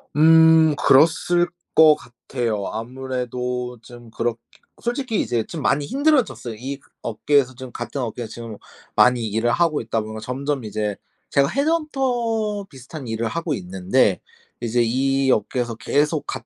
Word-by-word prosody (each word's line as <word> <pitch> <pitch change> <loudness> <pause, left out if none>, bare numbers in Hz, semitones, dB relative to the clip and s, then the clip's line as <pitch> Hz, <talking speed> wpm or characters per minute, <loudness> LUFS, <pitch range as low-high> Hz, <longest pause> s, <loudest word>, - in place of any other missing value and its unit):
음. 160 0 +6
그랬을 165 +5 +4 0.3
것 155 -1 +8
같아요. 120 -4 -4
아무래도 125 0 -4
좀 120 -1 -13
그렇게 115 0 -2 0.4
솔직히 240 -2 -1
이제 115 -2 -1
좀 160 -4 -6
많이 145 +1 +1
힘들어졌어요. 265 - +1
이 135 +4 -6 0.2
업계에서 130 +3 +1
좀 130 0 -9
같은 120 +4 -5
업계에서 115 -1 -5
지금 115 -3 -8 0.4
많이 125 -2 +4
일을 110 +3 0
하고 165 -1 +1
있다 115 0 -2
보면 110 0 -7
점점 135 +3 -3
이제 105 -1 -2 0.3
제가 140 0 +3
헤드헌터 245 - -1
비슷한 135 0 -10
일을 115 0 -2
하고 165 +4 -2
있는데 95 +2 +1 0.4
이제 120 +1 +1
이 135 +3 +1
업계에서 120 +2 -1
계속 145 +7 0
같 - - -5
130 Hz, 305 characters per minute, -22 LUFS, 115-160 Hz, 0.4 s, 것